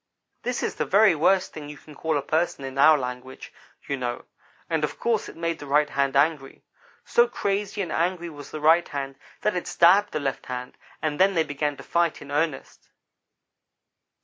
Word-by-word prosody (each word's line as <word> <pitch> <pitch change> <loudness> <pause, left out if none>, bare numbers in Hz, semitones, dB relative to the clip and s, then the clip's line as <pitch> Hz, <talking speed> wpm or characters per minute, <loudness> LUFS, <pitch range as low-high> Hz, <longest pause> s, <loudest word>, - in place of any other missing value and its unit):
That 245 0 -2
is - - -1
the - - -2
very 205 0 +5
worst 185 +4 +2
thing 150 -2 -8
you 150 - -9
can 155 - -15
call 160 +1 -1
a 140 - -2
person 155 -2 -1
in 135 +1 -6
our 155 +2 +7
language, 125 0 -7 0.3
you 140 - -1
know, 120 -1 -4 0.4
and 160 -2 -1
of 150 - -3
course 230 -3 0
it - - -12
made 165 0 -2
the 145 - -9
right 145 +1 +2
hand 140 0 0
angry. 140 -1 +1 0.4
So 240 0 +4
crazy 200 -3 -2
and 175 - -6
angry 175 +1 -1
was 145 -1 -10
the 155 - -7
right 165 +3 +5
hand 135 -1 -5 0.3
that 210 - 0
it 180 - -3
stabbed 190 +5 +4
the 155 - -2
left 135 -2 -3
hand, 125 0 -6 0.3
and 155 0 -1
then 190 +1 +4
they 165 - +3
began 145 -1 -2
to - - -10
fight 170 -1 0
in 145 - -11
earnest. 150 -1 -3
155 Hz, 200 wpm, -25 LUFS, 140-175 Hz, 0.4 s, our